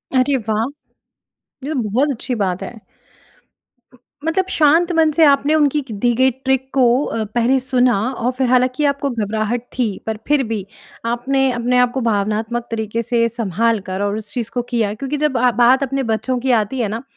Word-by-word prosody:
अरे 260 +2 +3
वाह! 220 -1 -1 1.0
ये 295 +3 -3
तो 275 - -1
बहुत 260 +8 +1
अच्छी 255 0 -4
बात 190 -4 -2
है। - - -7 1.2
उ - - -19 0.3
मतलब 350 +4 +1
शांत 330 +2 +3
मन 320 -1 +3
से 325 - +5
आपने 285 +1 +3
उनकी 295 -1 +2
की 260 -5 -9
दी 240 +4 +1
गई 260 +2 +4
ट्रिक 265 +1 -2
को 270 - +2 0.2
अ, 225 - -2
पहले 245 +3 +3
सुना 250 -4 +2
और 245 0 -1
फ़िर 260 -1 +1
हालाँकि 255 +3 +2
आपको 280 0 0
घबराहट 220 0 -2
थी, 245 -2 0 0.2
पर 220 -1 -2
फ़िर 290 -2 +3
भी 215 -4 -3 0.4
आपने 260 +3 +1
अपने 245 +1 0
आप 250 -1 +3
को 265 - -2
भावनात्मक 220 +1 -1
तरीक़े 220 0 -2
से 230 0 +1
सँभाल 230 0 0
कर 190 +1 -3
और 205 0 -1
उस 215 -1 -9
चीज़ 230 -2 -4
को 245 - 0
किया 220 -4 0
क्योंकि 275 +6 -4
जब 295 -3 0
आप 245 0 +3
बात 250 +3 +4
अपने 275 0 -2
बच्चों 230 +2 -1
की 260 +1 0
आती 230 +2 +1
है 230 - +1
ना, 225 +3 -4
245 Hz, 195 wpm, -19 LUFS, 225-270 Hz, 1.2 s, से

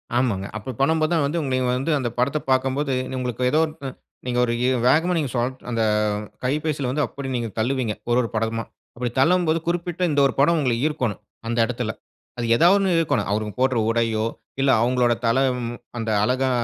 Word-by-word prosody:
ஆமாங்க. 115 -6 +1
அப்ப 120 +5 -6
பண்ணும்போது 155 +3 +2
தான் 160 -3 +2
வந்து 155 +4 -1
உங்கள 130 -2 0
வந்து 135 +6 -1
அந்த 125 -3 -1
படத்த 130 +5 +1
பாக்கும்போது, 135 +2 +1 0.3
உங்களுக்கு 125 0 -3
ஏதோ 155 - +3 0.6
நீங்க 125 -1 -1
ஒரு 120 - -1 0.3
வேகமா 165 +7 +3
சோ - - +1
நீங்க 145 -6 -1 0.4
அந்த 115 -1 0 0.6
கைபேசியில 145 0 -1
வந்து 150 +3 0
அப்டி 135 -1 -6
நீங்க 120 -2 -2
தள்ளுவீங்க. 120 -1 0 0.2
ஒரு, 120 - +3
ஒரு 115 - -3
படமா 115 +1 -1 0.3
அப்டி 125 0 -1
தள்ளும்போது 165 +2 +3
குறிப்பிட்ட 175 0 -2
இந்த 145 - +2
ஒரு - - -4
படம் 165 +5 +4
உங்கள 125 -4 +1
ஈர்க்கணும், 125 - -1 0.3
அந்த 115 +1 -2
இடத்துல. 120 -1 -3 0.5
அது 120 - -2
ஏதாவது 175 +9 +5
ஒண்ணு 190 -3 +2
ஈர்க்கணும், 145 -11 0
அவங்க 105 0 -1
போடுற 130 -1 +2
உடையோ 115 -1 +1 0.4
இல்ல, 135 0 +4
அவங்களோட 125 0 +2
தல 115 +3 +3 0.2
ம் 120 0 -4 0.2
அந்த 115 -1 -2
அழகா 130 +3 +1
130 Hz, 175 wpm, -23 LUFS, 120-150 Hz, 0.6 s, ஏதாவது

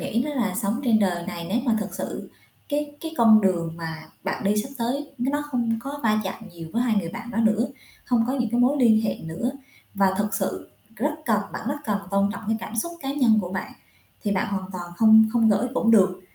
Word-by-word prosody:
nghĩ 235 +3 0
đó 295 - -3
là 215 -9 0
sống 210 +7 -1
trên 230 -3 +4
đời 175 -4 0
này 170 0 -5
nếu 210 +6 +1
mà 225 -2 +3
thật 200 - -3
sự - - -5 0.4
cái 290 0 -2
cái 325 0 -6
con 225 -3 +7
đường 175 -4 +1
mà 160 -1 -6 0.2
bạn 190 +2 -3
đi 205 +2 +2
sắp 270 - -8
tới 275 +5 -2
n 240 - -1
nó 290 0 0
không 235 -3 0
có 280 +3 -6
va 215 -1 +3
chạm 205 +3 -6
nhiều 165 -1 -9
với 235 - +1
2 235 -3 +2
người 175 -4 0
bạn 240 +7 -7
đó 230 - -3
nữa, 220 +1 +3 0.4
hông 240 -2 +3
có 255 - 0
những 245 -5 -1
cái 240 +1 +2
mối 260 +4 +4
liên 220 -3 +5
hệ 220 - 0
nữa, 165 +10 -2 0.4
và 195 -1 +3
thực 205 -1 0
sự - - -3 0.3
rất 280 +7 0
cần 215 -3 +2
bạn 225 - -5
rất 285 - -1
cần 205 -3 0
tôn 200 0 +2
trọng 200 - -7
cái 220 - +2
cảm 230 - -6
xúc 340 +10 -1
cá 270 - -2
nhân 245 -6 +4
của 180 -2 -5
bạn 190 - -4 0.5
thì 205 -2 0
bạn 195 +2 0
hoàn 190 -1 -3
toàn 175 -1 -6
không 220 +1 +7
không 230 -2 +4
gởi 210 +5 +2
cũng 225 - +2
được, 190 -4 +4
220 Hz, 245 wpm, -24 LUFS, 195-245 Hz, 0.5 s, con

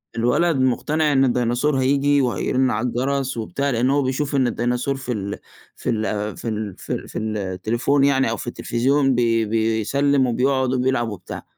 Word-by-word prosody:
الولد 125 +9 +2
مقتنع 150 +4 +1
إن 135 0 +4
الديناصور 125 +3 +1
هييجي 140 +2 +2
وهيرن 130 +1 +1
على 110 +4 -1
الجرس 135 +1 -1
وبتاع، 140 +5 -2
لأن 125 0 +1
هو 140 +1 +2
بيشوف 140 +2 -1
إن 130 -2 +3
الديناصور 125 +3 -1
في 130 -2 -5
ال 100 -3 -4 0.4
في - - -5
ال 105 -2 -2
في - - -7
ال 105 -3 -4
في - - -5
ال - - -5
في - - -6
التليفون 110 +6 -1
يعني 135 -3 +3
أو 115 - -2
في - - -7
التلفزيون 135 +3 +1
بي 115 -2 +2
بيسلّم 115 +6 +1
وبيقعد 130 +2 +1
وبيلعب 125 -2 0
وبتاع، 95 -4 -8
125 Hz, 170 wpm, -21 LUFS, 115-135 Hz, 0.4 s, إن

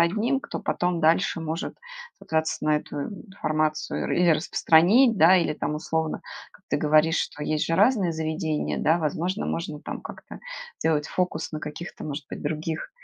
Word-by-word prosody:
одним, 215 +10 +2
кто - - -6
потом 175 -1 -1
дальше 165 +1 +2
может 160 +1 -4 0.4
сослаться 160 -1 -1
на 155 0 +3
эту 150 - -6 0.3
информацию, 155 -4 -1
и - - +1
или 175 -2 +5
распространить, 180 - +4
да, 180 +2 +7
или 165 -4 +1
там 150 - -2
условно, 160 0 -2 0.3
как - - -22
ты - - +1
говоришь, 155 +2 +3
что 150 - -3
есть 155 0 0
же 165 - 0
разные 200 -4 +3
заведения, 160 -1 -2
да, 160 +2 +3
возможно, 170 +5 -1
можно, 155 -3 -3
там, - - -6
как-то - - -10 0.4
сделать 150 -2 +1
фокус 180 -4 -2
на 155 - -4
каких-то, 155 +3 -7
может 145 -2 -5
быть, - - -7
других, 155 +2 -3
160 Hz, 165 wpm, -25 LUFS, 155-175 Hz, 0.4 s, да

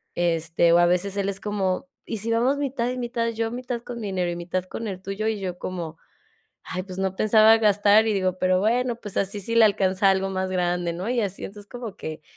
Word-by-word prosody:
Este, 170 0 +2
o 175 - +6
a 175 - +6
veces 185 +3 0
él 200 0 0
es 195 0 -4
como, 205 +2 -1 0.2
y 225 - -4
si 230 +2 -2
vamos 250 +5 +2
mitad 260 -4 -1
y 255 - -3
mitad, 235 -1 -1
yo 225 0 -2
mitad 245 -1 -4
con 240 -1 -7
mi 210 - -4
dinero 180 -2 -1
y - - -4
mitad 180 +1 -3
con 225 +4 -6
el 185 -2 -5
tuyo, 195 +3 -3
y 220 -2 -1
yo 180 -2 -4
como 170 -3 -5 0.7
ay, 185 0 -4
pues 185 -1 -9
no 190 -1 -1
pensaba 220 +1 +6
gastar 210 0 +4
y - - +2
digo: 185 -1 0
"Pero 185 0 +2
bueno, 240 +3 +1
pues 205 -4 -9
así, 200 +1 -1
sí 230 +4 -3
le 230 - +8
alcanza 195 -1 +2
algo 190 0 0
más 190 0 -2
grande, 175 -1 0
¿no?". 185 +6 -4
Y 245 -2 +1
así, 195 -1 -4
entonces 205 0 -10
como 235 -5 -7
que 155 -1 -7
195 Hz, 240 wpm, -24 LUFS, 185-225 Hz, 0.7 s, le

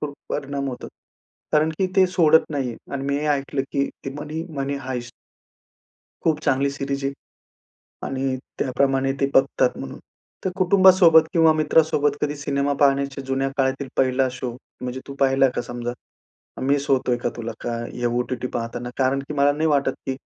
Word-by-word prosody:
खूप 145 -1 -4
परिणाम 140 -1 -3
होतो 125 - -6 0.6
कारण 155 +1 +3
की 190 - +2
ते 190 -1 +6
सोडत 160 -4 +4
नाही. 135 -5 -2 0.2
आणि 140 -1 -3
मी 140 0 0
हे 150 - -2
ऐकलं, 135 -1 -2
की 140 0 +1 0.2
ती 135 - -3
Money 150 +2 -5 0.2
Money 140 +1 -2
Heist 125 -2 -4 1.1
खूप 160 -2 +2
चांगली 140 +1 +2
सीरीज 140 0 -4
आहे. 135 - 0 0.9
आणि 135 0 -1 0.2
त्याप्रमाणे 135 +1 +1
ते 140 - +3
बघतात 135 - +3
म्हणून. - - -7 0.5
तर 185 - +1
कुटुंबासोबत 185 -3 +6
किंवा 165 -3 +5
मित्रासोबत 155 -1 +3
कधी 150 0 -1
सिनेमा 140 0 -1
पाहण्याच्या 140 -1 +2
जुन्या 135 +1 0
काळातील 135 0 0
पहिला 130 0 +2
शो 125 -1 -4 0.3
म्हणजे 125 +1 -4
तू 140 - -7
पाहिला 135 0 +4
का - - 0
समजा? 120 0 -5 0.6
अन् - - -4
मिस 140 +1 +1
होतोय 130 -2 +2
का 120 - -2
तुला 115 -1 -4
का 120 -1 -3 0.2
हे 120 - -5
ओ-टी-टी 125 +1 -1
पाहताना? 120 +1 -4
कारण 135 +1 +2
की 150 - -4
मला 140 0 +4
नाही 155 +2 0
वाटत, 140 -3 +2
की 135 - -1
140 Hz, 170 wpm, -23 LUFS, 130-150 Hz, 1.1 s, ते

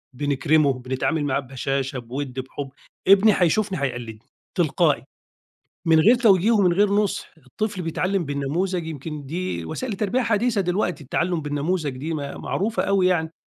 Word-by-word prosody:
بنكرمه، 145 +1 +2
بنتعامل 130 +4 -2
معاه 140 -1 +1
ببشاشة، 135 0 -3
بِوّد، 130 +2 -5
بِحُب 135 +2 -6 0.4
ابني 200 +2 +7
هيشوفني 185 -1 +1
هيقلدني، 120 -5 -4 0.4
تلقائي، - - +2 0.8
من 160 -1 +6
غير 220 +9 +6
توجيه 210 -3 +4
ومن 195 -6 +4
غير 205 +3 +3
نُصح، 205 -1 0 0.2
الطفل 195 - -3
بيتعلم 180 +2 -1
بالنموذج 160 +5 -2
يمكن 150 -1 -6
دي 160 - -3
وسائل 230 - -4
التربية 210 +5 0
حديثة 225 -1 +1
دلوقتي 180 -4 -1
التعلم 170 +4 -1
بالنموذج 145 0 -2
دي 155 +5 -4
م - - -1 0.2
معروفة 220 +4 -1
أوي 195 -2 +2
يعني. 160 -3 +1
160 Hz, 145 wpm, -23 LUFS, 140-195 Hz, 0.8 s, ابني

